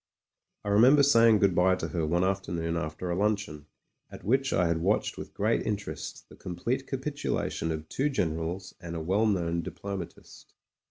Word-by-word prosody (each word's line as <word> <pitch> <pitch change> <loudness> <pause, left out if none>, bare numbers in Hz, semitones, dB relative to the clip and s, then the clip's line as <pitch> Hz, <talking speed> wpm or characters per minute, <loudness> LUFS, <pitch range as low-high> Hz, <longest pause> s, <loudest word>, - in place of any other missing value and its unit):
I - - -2
remember 125 +8 +6
saying 115 -5 +6
good 100 -2 +3
bye 90 +1 +4
to 90 - -4
her 80 -3 -1
one 85 +3 +1
afternoon 85 -3 -1
after 85 +2 -3
a - - 0
luncheon, 100 -7 -1 0.4
at - - -10
which 135 +5 +1
I 90 - +2
had 85 -1 +1
watched 95 +6 +1
with - - -9
great 110 +3 +1
interest 105 -2 -5
the - - -15
complete 115 +10 -3
capitulation 135 - -2
of 80 0 -5
two 135 - 0
generals 85 - -2
and 85 -1 -6
a - - -2
well 95 +7 +1
known 85 -4 0
diplomatist. 90 +1 -8
95 Hz, 170 wpm, -28 LUFS, 85-110 Hz, 0.4 s, remember